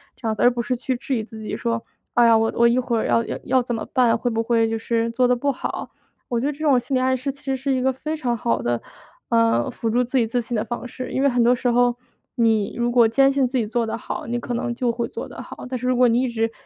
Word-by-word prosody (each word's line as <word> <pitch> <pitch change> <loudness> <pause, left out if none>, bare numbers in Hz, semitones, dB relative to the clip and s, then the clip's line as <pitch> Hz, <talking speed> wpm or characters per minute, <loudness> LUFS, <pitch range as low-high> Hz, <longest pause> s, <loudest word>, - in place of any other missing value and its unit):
这 - - -12
样 220 - 0
子， - - -4
而 245 - +6
不 240 -1 -2
是 245 +2 -1
去 255 +1 -2
质 270 +1 -2
疑 225 - -1
自 220 0 -11
己 215 - -4
说： 230 -1 -2 0.3
“哎 240 - +5
呀， 230 -1 +6
我 225 0 +2
我 235 - +5
一 235 +1 +2
会 245 -2 -1
儿 - - -1
要 230 - +3 0.2
要 260 - +3
怎 240 0 -4
么 225 - -4
办？ 245 -3 +4
会 245 - -1
不 225 0 0
会 230 -1 +2
就 225 - -1
是 230 0 0
做 250 +2 +2
得 250 - +4
不 280 +4 -1
好？” 260 - -5 0.4
我 240 - 0
觉 - - -1
得 290 - +1
这 285 - -17
种 295 -4 +4
心 265 +3 -3
理 255 - +2
暗 260 0 +2
示 270 +2 -3
其 280 - -20
实 270 -1 -1
是 270 +2 -2
一 260 - 0
个 265 +1 +2
非 305 +5 -4
常 245 -5 -1
好 115 - 0
的， 120 0 -1 0.5
嗯， 115 +1 +2
辅 230 - -3
助 245 +3 +2
自 255 +3 -1
己 235 -3 +2
自 245 +2 0
信 235 +1 -5
的 215 - 0
方 240 +1 -5
式。 255 +1 -7
因 265 - -1
为 280 - +5
很 245 -2 +1
多 245 +2 +5
时 250 +1 -2
候， 245 0 +3 0.4
你 225 -4 +2
如 240 0 0
果 240 -2 +5
坚 270 +4 +4
信 275 -2 +2
自 260 +2 -2
己 235 - +1
做 230 +2 -1
得 220 - -3
好， - - -6
你 240 +1 -1
可 240 - -5
能 240 0 -2
就 245 -1 0
会 235 0 -3
做 - - -6
得 - - -8
好。 - - -9
但 255 - -2
是 250 - -3
如 255 - +2
果 250 0 +5
你 235 +2 +2
一 260 - 0
直 225 -1 -1
240 Hz, 330 characters per minute, -22 LUFS, 230-255 Hz, 0.5 s, 而